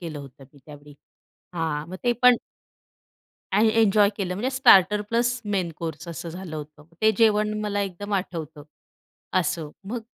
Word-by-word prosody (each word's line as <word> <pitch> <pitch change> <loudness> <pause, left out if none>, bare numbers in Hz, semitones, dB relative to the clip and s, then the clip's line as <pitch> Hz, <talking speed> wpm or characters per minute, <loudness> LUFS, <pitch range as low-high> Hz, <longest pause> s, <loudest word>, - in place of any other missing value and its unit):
केलं 165 -4 -6
होतं 135 -1 -12
मी 140 - -19
त्यावेळी 145 -1 -13 0.6
हां, 160 -2 -2
मग 185 - -7
ते 240 - +3
पण 250 -1 +7 1.2
आणि 220 +2 +4
एन्जॉय 205 -1 +4
केलं 185 -3 -3
म्हणजे 245 +8 -2
स्टार्टर 210 -5 +6
प्लस 240 +1 +1
मेन 190 -5 -1
कोर्स 165 0 -6
असं 170 0 -6
झालं 170 -2 -7
होतं. 150 0 -10 0.2
ते 220 - +6
जेवण 215 -2 +3
मला 205 -1 -2
एकदम 200 +2 -6
आठवतं. 165 -5 -4 0.8
असं. 160 -2 -3
मग 230 +4 -4
185 Hz, 155 wpm, -24 LUFS, 155-210 Hz, 1.2 s, पण